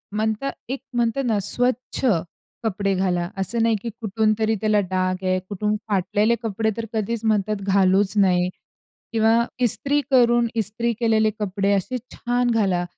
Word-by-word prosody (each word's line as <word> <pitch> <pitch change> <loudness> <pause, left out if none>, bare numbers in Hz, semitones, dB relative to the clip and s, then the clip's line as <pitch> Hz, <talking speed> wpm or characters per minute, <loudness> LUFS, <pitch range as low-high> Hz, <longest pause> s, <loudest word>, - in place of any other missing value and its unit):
म्हणतात 220 +5 -1 0.2
एक 265 +1 -2
म्हणतात 240 +3 0
ना 220 -4 +1
स्वच्छ 250 +6 -1 0.6
कपडे 200 -2 0
घाला. 180 -2 0
असं 225 +5 -1
नाही 230 -1 +3
की 235 - -4
कुठून 215 +1 +1
तरी 220 0 +2
त्याला 215 -1 +3
डाग 185 0 -1
आहे, 185 0 +1
कुठून 210 +1 -1
फाटलेले 205 +3 +1
कपडे 220 0 0
तर 230 - -3
कधीच 220 +1 -2
म्हणतात 215 -1 +1
घालूच 195 0 +3
नये 180 -2 +3 0.6
किंवा 225 0 +4 0.3
इस्त्री 280 +5 +1
करून 240 -2 +4
इस्त्री 230 +2 -1
केलेले 220 -2 +3
कपडे 200 0 0
असे 200 +6 -1 0.2
छान 245 0 0
घाला. 195 -6 +1
215 Hz, 150 wpm, -23 LUFS, 195-230 Hz, 0.6 s, किंवा